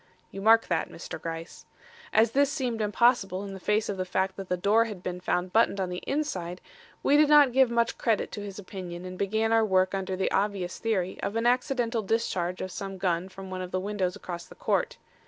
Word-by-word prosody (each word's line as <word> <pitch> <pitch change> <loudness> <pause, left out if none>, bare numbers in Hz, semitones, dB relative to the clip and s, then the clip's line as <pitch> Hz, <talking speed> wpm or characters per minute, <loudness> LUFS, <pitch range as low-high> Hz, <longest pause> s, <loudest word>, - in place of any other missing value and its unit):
(You 195 - -7
mark 225 +2 +6
that, - - -1
Mr. 165 - -8
Gryce.) 165 0 -7 0.4
As 220 +1 +4
this 280 +2 +3
seemed 250 -7 -2
impossible 210 -3 +2
in 195 -1 -7
face 210 +3 +1
of 200 - -3
the 185 - -1
fact 190 +1 -1
that 195 -2 -8
the 180 - 0
door 210 +5 +3
had 205 -5 -7
been 180 0 -4
found 180 0 -1
buttoned 220 -3 +3
on 185 -1 -1
the 180 0 -5
inside, 185 - -2 0.4
we 290 - +5
did 300 0 +5
not 295 -3 +7
give 260 0 +4
much 235 0 0
credit 225 -3 0
to 205 - -6
his 200 -1 -7
opinion 185 -3 -7
and 185 0 -6
began 220 +4 0
our 225 0 +5
work 185 -2 +2
under 190 -1 -2
the 190 0 -1
obvious 195 -3 -1
theory 190 -5 -1
of 205 - -3
an 230 +1 0
accidental 245 -2 +1
discharge 185 -4 -1
of 185 - -4
some 195 +1 -6
gun 180 0 -1
from 190 0 -10
one 185 0 -4
of 180 - -5
the 185 - -1
windows 190 -2 -2
across 180 -3 -7
the - - -14
court. 485 0 0
195 Hz, 220 wpm, -28 LUFS, 185-230 Hz, 0.4 s, not